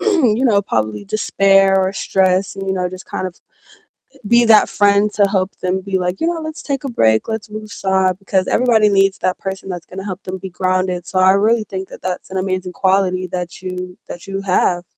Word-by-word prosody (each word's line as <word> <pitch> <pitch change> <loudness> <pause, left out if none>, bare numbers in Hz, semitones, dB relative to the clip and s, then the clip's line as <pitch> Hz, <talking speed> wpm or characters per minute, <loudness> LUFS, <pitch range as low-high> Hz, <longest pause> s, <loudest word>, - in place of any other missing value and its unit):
you 270 - +2
know, 205 -5 +3
probably 110 - -2
despair 195 -2 +3
or 190 0 +1
stress 190 0 0
and, 195 - -5
you 190 - 0
know, 180 -1 -1
just, 185 0 -10
kind 185 - -4
of, 180 - -9 0.8
eh, - - -19
be 235 +2 +5
that 220 -2 +6
friend 205 +1 +2
to 205 -1 +4
help 190 -1 -1
them 185 +1 -1
be 190 0 -2
like, 180 +1 -2
"You 325 - +1
know, 340 -1 -2
let's 315 0 -7
take 275 -2 -3
a 275 - -3
break, 110 - +2
let's 220 -1 -4
move 215 0 -7
aside," 190 -3 0
because 195 -1 0
everybody 225 -4 +3
needs 195 -1 +2
that 185 - -1
person 190 0 -6
that's 175 -2 -6
gonna 195 +1 -8
help 190 -1 -6
them 185 0 -5
be 190 - -7
grounded, 185 0 -1
so 185 - -2
I 185 0 +6
really 215 +3 +2
think 190 -2 -6
that - - -12
that's 185 0 -4
an 190 - -5
amazing 185 -1 -2
quality 185 -1 +1
that 180 0 -5
you 180 -1 -6
that 175 - -9
you 195 0 -3
have. 180 -2 +1
190 Hz, 220 wpm, -18 LUFS, 185-205 Hz, 0.8 s, that